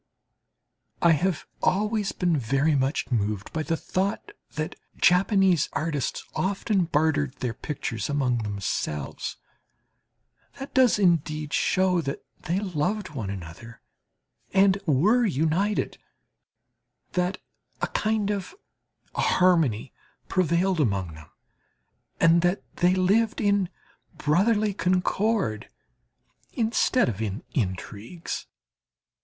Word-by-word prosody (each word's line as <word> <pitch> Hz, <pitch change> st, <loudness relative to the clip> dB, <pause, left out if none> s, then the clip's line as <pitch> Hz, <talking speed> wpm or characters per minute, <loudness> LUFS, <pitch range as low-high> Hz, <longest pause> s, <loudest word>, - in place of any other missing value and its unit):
I 170 Hz, -, +7 dB
have 170 Hz, +3 st, +1 dB, 0.2 s
always 210 Hz, +1 st, +1 dB
been 175 Hz, -3 st, +1 dB
very 135 Hz, +4 st, +1 dB
much 135 Hz, 0 st, 0 dB
moved 105 Hz, -3 st, -1 dB
by 160 Hz, -, -1 dB
the 165 Hz, +1 st, -1 dB
thought 190 Hz, +4 st, -2 dB, 0.2 s
that 155 Hz, 0 st, -3 dB, 0.2 s
Japanese 185 Hz, -2 st, +4 dB
artists 150 Hz, -4 st, -2 dB
often 195 Hz, 0 st, 0 dB
bartered 150 Hz, -3 st, +1 dB
their 125 Hz, -3 st, -3 dB
pictures 115 Hz, -6 st, -4 dB
among 130 Hz, -4 st, +1 dB
themselves. 100 Hz, -9 st, -3 dB, 1.2 s
That 270 Hz, -, -8 dB
does 260 Hz, -5 st, +5 dB
indeed 155 Hz, -5 st, +1 dB
show 185 Hz, -2 st, +2 dB
that 140 Hz, -2 st, -5 dB
they 175 Hz, +4 st, -1 dB
loved 190 Hz, +1 st, -2 dB
one 120 Hz, -9 st, -4 dB
another 95 Hz, +5 st, -8 dB, 0.8 s
and 195 Hz, 0 st, +5 dB
were 195 Hz, -, +4 dB
united, 180 Hz, -, 0 dB, 1.1 s
that 180 Hz, +1 st, 0 dB, 0.4 s
a -, -, 0 dB
kind 215 Hz, -1 st, 0 dB
of 200 Hz, -, -4 dB, 0.6 s
harmony 160 Hz, -, +2 dB, 0.3 s
prevailed 180 Hz, +1 st, +1 dB
among 100 Hz, -, 0 dB
them, 75 Hz, 0 st, -13 dB, 0.9 s
and 165 Hz, +1 st, +5 dB
that 180 Hz, +3 st, +1 dB
they 180 Hz, +1 st, +3 dB
lived 210 Hz, +5 st, +2 dB
in 200 Hz, -3 st, +2 dB, 0.5 s
brotherly 205 Hz, +7 st, +2 dB
concord 185 Hz, -, 0 dB, 0.8 s
instead 235 Hz, +2 st, +2 dB
of 110 Hz, -3 st, -3 dB
in 105 Hz, +1 st, -3 dB
intrigues. 105 Hz, -, -4 dB
170 Hz, 105 wpm, -26 LUFS, 130-195 Hz, 1.2 s, I